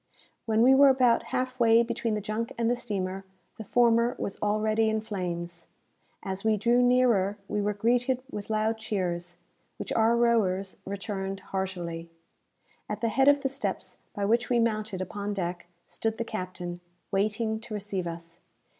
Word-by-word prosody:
When 220 0 +3
we 260 +2 +7
were 275 +1 +7
about 255 -3 +3
half 255 0 -2
way 230 0 +6
between 235 -1 -2
the 210 - -2
junk 215 +3 -3
and 230 -1 +1
the 240 - +2
steamer, 195 -5 -3 0.4
the - - -4
former 235 +2 +3
was 195 - -5
already 215 +1 +2
in 220 0 0
flames. 175 -5 -5 0.6
As 190 0 -4
we 220 -1 +3
drew 235 +4 +3
nearer, 245 -6 +3
we 210 0 -1
were 205 0 0
greeted 245 +4 +1
with 205 0 -6
loud 220 +1 0
cheers, 175 -5 -3 0.4
which - - -4
our 230 +1 +3
rowers 200 -5 +1
returned 195 -1 -4
heartily. 175 -3 -4 0.8
At 210 0 -4
the 230 - +1
head 270 +5 +3
of 285 0 +6
the 270 - 0
steps 275 +1 -4 0.2
by 200 - -1
which 235 +3 +2
we 245 - +3
mounted 215 -4 0
upon 205 +2 -4
deck, 175 -2 -3 0.2
stood 225 0 -3
the 230 - -2
captain, 180 -4 -5 0.3
waiting 215 +2 0
to 220 -1 -7
receive 195 -3 -3
us. 170 0 -8
215 Hz, 165 wpm, -28 LUFS, 190-235 Hz, 0.8 s, we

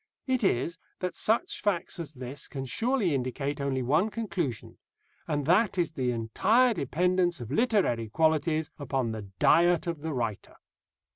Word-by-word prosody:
It 255 -3 0
is, 170 0 0 0.2
that 180 -1 -3
such 290 - +1
facts 190 -2 -1
as 155 -2 -5
this 130 +1 -6
can 135 -2 -5
surely 225 - +1
indicate 135 +2 -2
only 135 -2 -1
one 155 - +2
conclusion, 175 - -4 0.5
and 145 -2 -1
that 190 +5 +3
is 170 -3 +1
the 130 -5 -1
entire 215 - +2
dependence 175 - +1
of 120 0 -7
literary 155 - +1
qualities 155 +2 +1
upon 135 -4 -1
the 110 -2 -6
diet 175 - +4
of 170 -4 -3
the 160 +1 -3
writer. 115 -7 -3
155 Hz, 150 wpm, -28 LUFS, 130-185 Hz, 0.5 s, diet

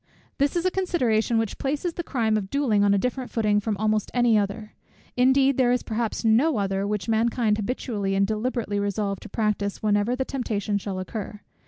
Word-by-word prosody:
This 280 +3 +1
is 345 +1 0
a 370 - +3
consideration 245 -13 +1
which 225 -2 -2
places 295 +5 -2
the 345 - -3
crime 230 -9 0
of 200 -3 -2
duelling 235 -7 +2
on 200 - +4
a 200 - +4
different 250 +4 -2
footing 210 -2 +1
from 210 0 -2
almost 215 0 0
any 240 -2 +4
other; 210 +1 -2 0.4
indeed 265 +1 +4
there 245 -2 +4
is 250 - +1
perhaps 230 0 -3
NO 240 +6 +3
other, 195 0 -1
which 210 -3 -2
mankind 225 -1 +1
habitually 205 -3 -2
and 195 0 +3
deliberately 220 0 -2
resolve 200 -1 -2
to - - -11
practise 210 -1 -1
whenever 210 +3 +2
the 265 +1 -2
temptation 215 -6 -2
shall 195 -1 -5
occur. 205 +2 -6
220 Hz, 190 wpm, -25 LUFS, 205-250 Hz, 0.4 s, on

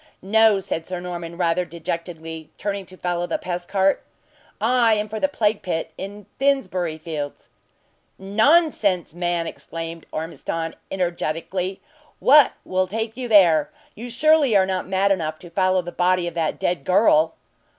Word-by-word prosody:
"No!" 220 +1 +4
said 165 -3 -4
Sir 185 -1 -4
Norman, 170 -1 -6
rather 175 0 +1
dejectedly, 165 -2 -6
turning 200 -2 -3
to 185 - -14
follow 175 -1 -2
the - - -1
pest 175 -1 -5
cart. 195 0 +2 0.6
"I 230 -1 +3
am 210 0 -1
for 220 +1 -5
the 285 - +2
plague 220 -6 0
pit 165 -3 -3
in 200 +2 -8
Finsbury 185 - 0
fields!" 155 -3 -6 0.7
"Nonsense, 205 - +2
man!" 175 -1 -1
exclaimed 165 0 -7
Ormiston, 165 +1 -4
energetically, 180 +1 -2 0.4
"what 290 0 +6
will 185 0 0
take 225 +3 -3
you 250 0 -4
there? 175 -9 +5 0.2
You 240 +3 -8
surely 295 -1 +4
are 190 - +4
not 185 -1 -2
mad 195 +1 +2
enough 160 -5 -1
to 175 -2 -13
follow 185 0 +2
the 175 - -6
body 180 0 +1
of 170 - -4
that 165 -2 -1
dead 175 -5 -1
girl?" 165 -3 +4
185 Hz, 150 wpm, -22 LUFS, 170-210 Hz, 0.7 s, what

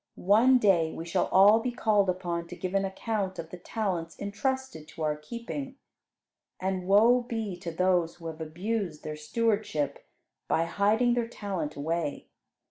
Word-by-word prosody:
One 225 +7 +5
day 180 -8 +3
we 165 - -6
shall 175 +2 0
all 205 +4 +6
be 250 +2 -2
called 210 -5 +2
upon 175 -2 -2
to - - -8
give 185 0 -4
an 195 0 +2
account 195 0 -3
of 165 -1 -7
the 180 - -8
talents 180 -5 -3
entrusted 210 - -3
to 160 - -7
our 150 -1 +1
keeping, 235 - -6 0.8
and 185 -1 -2
woe 225 +5 +6
be 225 -5 -4
to 175 -1 -6
those 180 -1 +1
who 170 - -14
have 160 0 -6
abused 175 +1 -3
their 155 0 -4
stewardship 200 -4 -1 0.4
by 165 - +2
hiding 215 +7 +2
their 240 -1 0
talent 190 -9 -4
away. 160 +1 -3
190 Hz, 160 wpm, -28 LUFS, 165-220 Hz, 0.8 s, all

